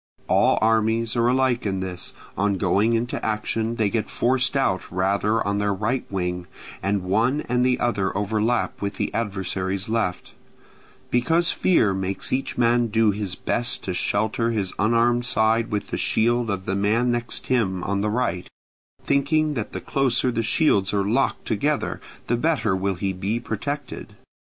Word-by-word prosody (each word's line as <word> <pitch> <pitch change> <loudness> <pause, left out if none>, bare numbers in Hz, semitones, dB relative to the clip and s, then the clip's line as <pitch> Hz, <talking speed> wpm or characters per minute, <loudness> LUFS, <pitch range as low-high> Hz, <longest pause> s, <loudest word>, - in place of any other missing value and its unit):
All - - +3
armies 110 +1 +2
are 120 0 +2
alike 130 -1 +2
in 95 -2 -1
this: 90 -1 -5 0.2
on 100 0 +1
going 105 +4 +2
into 115 +1 -1
action 110 +1 -1
they 110 -3 +1
get 115 -2 -1
forced 130 +2 +1
out 95 -9 +1
rather 100 +4 +1
on 100 +1 0
their 100 -1 0
right 115 +6 -2
wing, 90 -2 -3 0.3
and 100 0 0
one 115 +10 +1
and 125 -2 0
the 125 0 +2
other 100 -5 0
overlap 110 +3 0
with 100 0 -3
this - - -2
adversary's 95 -2 -2
left; 110 -6 -2 0.8
because 165 +8 +2
fear 115 - +2
makes 95 +3 -2
each 135 +1 -2
man 120 0 +3
do 110 -1 +3
his 100 -2 -3
best 120 +4 -1
to 95 - -3
shelter 110 +5 0
his 105 -5 -2
unarmed 120 +3 +2
side 115 0 +2
with 105 -2 -3
the - - -2
shield 120 +1 +1
of 95 -2 -3
the 95 - -1
man 110 +5 +2
next 120 0 -2
him 95 -8 0
on 100 +1 -1
the 105 - 0
right, 105 -6 -1 0.6
thinking 150 +2 +2
that 115 -6 -4
the - - -5
closer 130 -2 +1
the 115 - -1
shields 105 -4 +2
are 100 -1 +1
locked 125 +6 0
together 145 +7 -1 0.2
the 120 - +1
better 120 -7 +1
will 95 +1 -1
he 95 +1 -2
be 100 +5 -2
protected. 140 +5 -5
110 Hz, 165 wpm, -23 LUFS, 100-120 Hz, 0.8 s, All